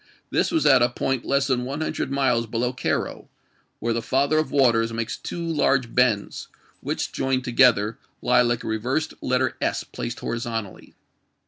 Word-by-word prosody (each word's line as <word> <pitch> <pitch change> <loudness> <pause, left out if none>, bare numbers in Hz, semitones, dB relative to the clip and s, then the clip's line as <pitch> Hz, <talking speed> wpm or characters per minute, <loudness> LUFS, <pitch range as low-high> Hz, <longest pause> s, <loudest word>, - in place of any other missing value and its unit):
This - - +2
was 325 - +1
at 130 -2 +6
a 120 - +4
point 130 +1 -2
less 140 0 +2
than 125 -2 0
one 140 +4 -4
hundi - - -3
ed - - -1
miles 130 -4 +1
below 120 +3 -1
Cairo, 125 - -3 0.5
where 115 +1 -1
the 115 - -1
Father 140 +6 +1
of 155 - -1
Waters 115 -5 +3
makes 115 0 -3
two 170 -1 -6
large 135 -6 +1
bends, 120 -5 +1 0.3
which, - - -3
joined 130 -1 -1
together, 120 -4 +3 0.2
lie - - +3
like 120 -1 0
a - - -6
reversed 125 +9 -1
letter 130 +1 0
S - - 0
placed - - -6
horizontally. 115 -3 -5
125 Hz, 175 wpm, -24 LUFS, 115-135 Hz, 0.5 s, at